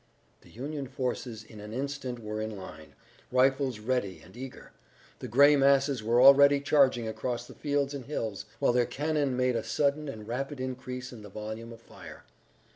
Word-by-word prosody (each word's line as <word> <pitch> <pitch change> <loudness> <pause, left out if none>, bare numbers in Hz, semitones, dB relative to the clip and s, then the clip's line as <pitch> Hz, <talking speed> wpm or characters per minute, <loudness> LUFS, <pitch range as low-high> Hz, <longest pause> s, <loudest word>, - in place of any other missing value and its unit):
The - - -19
Union 140 +3 -5
forces 125 -3 -4
in 110 0 -13
an 105 +1 -8
instant 135 -1 -4
were 110 -1 -5
in 110 -1 -4
line, 80 -5 -11 0.4
rifles 130 -1 +2
ready 105 -6 -2
and 90 - -16
eager. 130 +1 -9 0.5
The - - -6
gray 140 +6 +6
masses 140 -2 +3
were 115 +3 +2
already 140 +2 +8
charging 135 -5 +3
across 120 +2 -3
the - - -12
fields 145 -1 -1
and 135 -4 -6
hills, 110 -9 -4
while - - +2
their 120 -1 +2
cannon 145 -3 -1
made 125 -1 +2
a 115 - -1
sudden 140 +6 0
and 110 -5 -8
rapid 135 +4 -4
increase 125 0 -5
in 115 - -10
the 105 - -10
volume 110 +3 -7
of 115 0 -12
fire. - - -13
125 Hz, 180 wpm, -29 LUFS, 110-140 Hz, 0.5 s, already